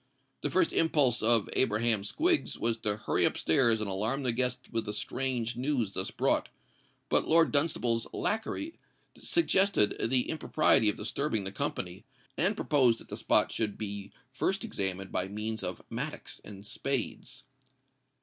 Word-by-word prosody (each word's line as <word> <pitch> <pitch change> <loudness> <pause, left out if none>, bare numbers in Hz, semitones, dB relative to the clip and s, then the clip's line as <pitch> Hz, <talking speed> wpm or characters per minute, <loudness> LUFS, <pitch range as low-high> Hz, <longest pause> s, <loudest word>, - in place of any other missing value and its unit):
The - - -1
first 335 - +2
impulse 145 -7 +3
of 115 -1 +3
Abraham 110 -3 +3
Squiggs 335 - 0
was 115 0 +1
to 105 -2 -1
hurry 110 - 0
up - - +2
stairs 115 +5 +3
and 110 - -3
alarm 110 +8 -1
the 125 - +1
guests 125 +1 -2
with 115 -1 -1
the 105 - -4
strange 120 +1 -2
news 125 -4 -1
thus 95 -1 -2
brought; - - 0 0.6
but - - +1
Lord 165 0 +4
Dunstable's 125 -6 +1
lacquey 225 +9 -2 0.4
suggested 195 - +2
the 130 -1 +1
impropriety 155 -8 +3
of - - -3
disturbing 130 -8 -2
the 95 - -5
company, 90 0 -4 0.3
and 205 +3 +1
proposed 130 - +3
that - - -15
the - - -5
spot - - +2
should 105 -3 -2
be 100 -1 -5 0.2
first 195 - -1
examined 95 - -1
by 90 - -1
means 105 +2 -4
of - - -4
mattocks - - -6
and 100 -1 -11
spades. 135 +2 -3
115 Hz, 155 wpm, -30 LUFS, 105-140 Hz, 0.6 s, Lord